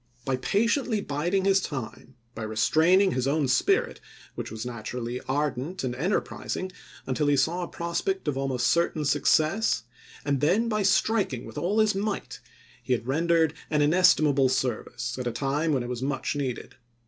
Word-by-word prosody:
By 130 -1 0
patiently 225 - +1
bid 160 +1 -2
ing 190 -1 +1
his 195 0 +4
time, 130 -4 -6 0.2
by 115 - -7
restraining 160 - +3
his 130 -3 -1
own 145 0 +1
spirit 125 - +1 0.3
which - - -6
was 110 +2 -6
naturally 120 +1 -5
ardent 145 +4 -2
and 125 -2 -1
enterprising, 185 +4 -2 0.3
until 135 +3 0
he 145 -1 +3
saw 165 +7 +1
a 175 - -3
prospect 170 +2 -3
of 145 - 0
almost 135 -2 -1
certain 170 -3 +1
success, 155 - +2 0.4
and 140 -2 0
then 190 +10 +2
by 215 -2 0
striking 195 - +1
with 115 - -7
all 195 +5 0
his 215 -1 +4
might, 200 +1 -3 0.4
he 130 - -1
had 115 -2 -2
rendered 160 +3 +2 0.2
an 150 -1 +2
inestimable 150 -5 +4
service, 120 -1 -2
at 125 - -3
a - - 0
time 145 +6 -1
when 135 -4 +1
it 120 - -6
was 125 -1 -4
much 135 +1 -2
needed. 135 -4 -4
145 Hz, 170 wpm, -26 LUFS, 130-180 Hz, 0.4 s, his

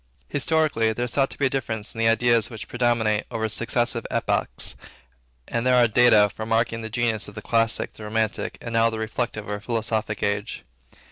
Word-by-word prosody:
Historically, 145 -6 +1
there 120 +3 -2
is 120 - -4
thought 135 -1 +2
to - - -8
be 140 - +1
a - - +3
difference 110 -5 -3
in 115 - -9
the 115 - +3
ideas 115 0 +3
which 110 -4 -8
predominate 120 -3 +1
over 110 -1 -2
successive 115 +1 0
epochs, - - -1 0.7
and 115 -1 -2
there 130 0 +4
are 120 -1 +5
data 110 -2 +5
for 105 +2 -8
marking 115 +1 0
the 110 - -6
genius 115 -1 0
of 105 - -12
the - - -5
Classic, 115 -1 +1
of - - -25
the 110 - -9
Romantic, 110 0 -2
and 115 - -6
now 115 0 +4
of 115 - -2
the - - -3
Reflective 110 -1 -3
or 105 0 -3
Philosophical 110 -1 -1
age. 100 +1 -3
115 Hz, 205 wpm, -24 LUFS, 110-120 Hz, 0.7 s, are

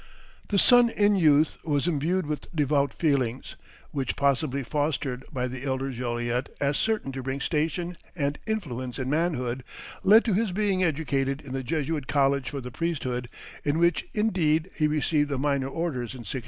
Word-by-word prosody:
The 205 - 0
son 245 +3 +7
in 205 -2 +3
youth 155 -4 +4
was 145 -2 0
imbued 175 +2 0
with 150 0 -4
devout 140 -2 +2
feelings, 135 -6 -1 0.4
which, 135 -4 -2
possibly 140 0 +1
fostered 140 -1 -1
by 125 -2 -1
the 130 +1 -7
elder 135 0 -1
Joliet 120 0 -2
as 140 0 +1
certain 220 -11 0
to 135 0 -5
bring 135 +2 -3
station 170 +4 -1 0.2
and 145 -3 -1
influence 130 - -3
in 130 -1 -2
manhood, 135 -6 0 0.4
led 215 +4 +7
to 220 - +1
his 210 +1 +1
being 195 -2 +1
educated 140 -4 0
in 140 -4 -9
the 135 - -2
Jesuit 150 0 -2
College 140 -2 +2
for 140 -2 -5
the 125 0 -7
priesthood, 130 -6 -2 0.3
in 145 +1 +1
which 170 -1 +2
indeed 180 -6 +1
he 155 - +2
received 150 0 +1
the 140 - -1
minor 140 -1 0
orders 135 -6 -3
in 125 - -8
1662. 130 - -3
145 Hz, 170 wpm, -27 LUFS, 130-165 Hz, 0.4 s, son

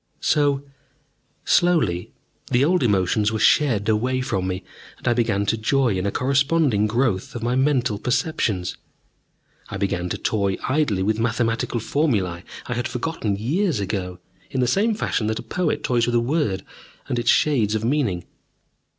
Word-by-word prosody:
So, 145 -2 +2 0.8
slowly, 155 - +2 0.4
the 125 +3 +3
old 180 +2 +2
emotions 105 -1 +2
were 110 - -1
shed 110 -3 +3
away 125 +4 +1
from 95 -7 -2
me, 95 0 -3 0.3
and - - -9
I 120 - +4
began 110 -4 +1
to 115 - +1
joy 130 +4 +2
in 95 +2 -1
a - - 0
corresponding 135 -4 +2
growth 115 -4 -1
of 115 - -5
my 120 +1 0
mental 130 -5 +1
perceptions. 125 - -1 0.9
I - - -5
began 90 -2 -1
to - - -2
toy 100 -3 0
idly 130 -8 +1
with 110 +2 0
mathematical 115 0 0
formulae 105 - 0 0.2
I 120 - -3
had 120 0 -2
forgotten 125 -6 -2
years 145 - 0
ago, 95 -2 -3 0.3
in 130 - -3
the 125 - +3
same 210 - +2
fashion 115 - -1
that 110 0 -1
a - - -6
poet 180 -1 -1
toys 120 -1 +1
with 120 - 0
a - - +5
word 120 - -1 0.4
and 125 -3 -1
its 120 - 0
shades 115 -8 +3
of 110 +1 -1
meaning. 115 - 0
120 Hz, 165 wpm, -22 LUFS, 100-135 Hz, 0.9 s, a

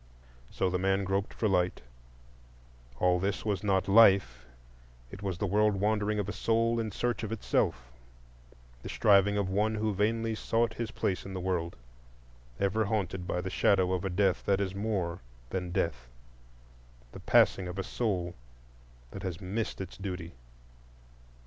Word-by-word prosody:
So - - -1
the 90 - 0
man 95 +1 +1
groped 95 +1 -1
for 110 - -1
light; 90 -2 +1 1.2
all 90 +4 +3
this 100 +4 -2
was 105 -2 -1
not 95 -2 +1
Life,—it - - +1
was 95 -3 -3
the 105 - -1
world 105 +1 +2
wandering 105 +1 0
of 100 -2 -1
a 105 - -3
soul 115 +2 +1
in 110 -1 -2
search 120 +2 -1
of 110 -2 -4
itself, 60 - -1 0.9
the - - -7
striving 100 0 +4
of 100 -2 0
one 105 +3 +1
who 110 0 0
vainly 110 +3 0
sought 115 +1 0
his 115 -1 -4
place 95 -3 -2
in 95 -1 -7
the - - -3
world, 90 -2 -2 0.8
ever 105 +3 +1
haunted 95 -4 -2
by 90 - -1
the 95 +1 -5
shadow 95 -2 +3
of 90 - -1
a 95 - -1
death 95 0 +1
that 100 -1 +3
is 95 -2 -2
more 95 -4 -2 0.3
than 90 -2 -3
death,—the - - -8
passing 95 - +3
of 90 +2 -6
a 95 - -1
soul 95 -8 -2 0.8
that 95 - -7
has 90 -3 -4
missed 100 +4 -3
its 95 -2 -7
duty. 90 -4 -6
95 Hz, 155 wpm, -30 LUFS, 90-105 Hz, 1.2 s, striving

